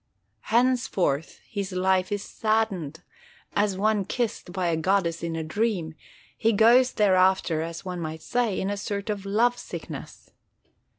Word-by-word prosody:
Henceforth 230 - +1
his 200 -2 -4
life 185 0 +1
is 205 -1 -2
saddened; 195 -8 -1 0.5
as 205 -2 +1
one 210 0 +2
kissed 220 -2 -3
by 180 -1 -1
a 165 - +1
goddess 170 0 +1
in 165 -1 -3
a 160 - -2
dream, 175 -1 -1 0.4
he 225 0 +2
goes 240 +5 +5
thereafter, 185 -5 +3
as 165 +2 -6
one 180 -1 -4
might 160 0 -5
say, 240 -5 0
in 195 - -1
a 205 - -2
sort 200 +1 -3
of 200 -1 -5
love 240 +4 +2
sickness. - - -8
195 Hz, 145 wpm, -26 LUFS, 175-220 Hz, 0.5 s, goes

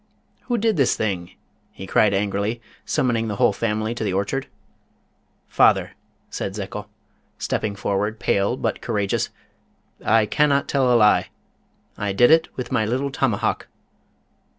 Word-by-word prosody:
"Who 240 - 0
did 220 -3 +1
this 135 -4 +3
thing?" 95 -5 -3 0.4
he 95 - -9
cried 105 +2 +3
angrily, 100 +3 -1 0.3
summoning 115 -3 0
the 105 - -3
whole 100 - +3
family 110 +1 -1
to 120 - -4
the 100 -3 -1
orchard. 100 +8 -2 1.0
"Father," - - +3 0.4
said - - -4
Zekel, - - -6 0.5
stepping 105 -2 -2
forward, 100 +2 -2
pale, 100 +6 +1
but - - -2
courageous, 105 -4 -1 0.7
"I 110 -1 +4
cannot 140 +4 +2
tell 130 -3 +2
a 120 - +5
lie, 105 -2 +4 0.7
I 100 -1 -1
did 120 +7 +5
it 160 0 +5
with 125 - -5
my 110 - +2
little 130 +6 -1
tomahawk." 130 -6 -1
110 Hz, 140 wpm, -22 LUFS, 100-130 Hz, 1.0 s, a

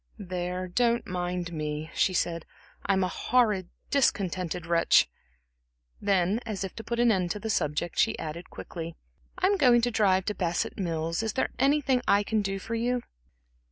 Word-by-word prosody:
"There, 180 -2 -3
don't 235 +5 +1
mind 180 -1 -3
me," 155 0 -4
she - - +2
said. 170 -2 -1 0.4
"I'm 190 -1 +3
a - - +1
horrid, 210 -4 +1 0.2
discontented 185 - 0
wretch." 170 - +4 0.9
Then, 195 +1 +2
as 200 -3 -4
if 190 - -6
to 225 - -6
put 235 +1 -3
an 240 -1 +5
end 185 -4 +1
to 210 - -3
the 220 +1 -2
subject, 150 0 -1
she - - +3
added 160 +3 -6
quickly: 165 -1 -7 0.4
"I'm 380 +2 +2
going 245 -6 +5
to 245 +1 +1
drive 190 -4 +3
to 210 - -1
Bassett 175 -1 -2
Mills. 165 -1 -1
Is 220 -1 -2
there - - 0
anything 270 -2 +3
I 200 +1 +4
can 215 +1 0
do 195 -1 -2
for 225 +4 -6
you?" 240 +1 0
190 Hz, 170 wpm, -28 LUFS, 175-230 Hz, 0.9 s, an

